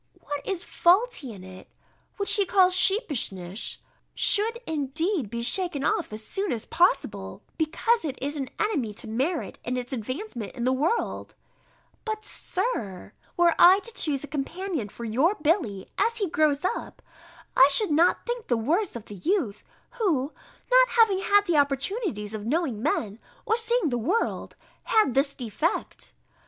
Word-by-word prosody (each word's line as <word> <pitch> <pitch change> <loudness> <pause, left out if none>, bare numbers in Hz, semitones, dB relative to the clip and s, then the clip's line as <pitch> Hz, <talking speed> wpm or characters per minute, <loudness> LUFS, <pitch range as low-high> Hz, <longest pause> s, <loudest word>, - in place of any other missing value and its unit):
What 290 -1 -5
is 375 -3 -2
faulty 355 - +2
in 195 -4 -11
it, 185 0 -12 0.5
which 400 - +3
he 405 - +4
calls 370 -1 +4
sheepishness, 230 - 0 0.4
should 445 +3 +3
indeed 310 - -1
be 235 +1 -4
shaken 305 +1 0
off - - 0
as 215 0 -6
soon 390 -1 -2
as 230 -3 -3
possible, 360 +8 0
because 395 +8 +1
it 280 -4 -4
is 285 +3 -3
an 270 -3 -4
enemy 280 - -1
to - - -1
merit 270 +10 -2
in 250 +1 -2
its 250 +1 -5
advancement 255 - -5
in 240 - -5
the 255 +1 +2
world: 310 - -1 0.7
but, 435 -1 -4
Sir, 220 - -4 0.2
were 345 -1 +5
I 365 +2 +8
to 465 - -8
choose 290 -8 0
a - - -6
companion 305 - -4
for 235 - -8
your 265 - +2
Billy, 300 - 0
as 460 0 +2
he 405 -4 0
grows 305 -1 +1
up, 465 - -4 0.5
I 265 - +8
should 405 +5 +5
not 330 +4 +3
think 480 -1 -4
the 240 - +1
worse 335 - 0
of 235 - -7
the - - -10
youth, 275 - -1 0.4
who, 310 - 0 0.4
not - - +6
having 415 -4 +5
had 405 +1 +3
the 340 -5 +1
opportunities 280 - -1
of 215 -1 -5
knowing 275 -6 -1
men, 225 -6 -1 0.3
or 445 - +2
seeing 460 -5 +1
the 245 -2 -1
world, 365 - -1 0.3
had 430 - +3
this 275 +2 +1
defect. 255 - -3
305 Hz, 160 wpm, -26 LUFS, 245-395 Hz, 0.7 s, I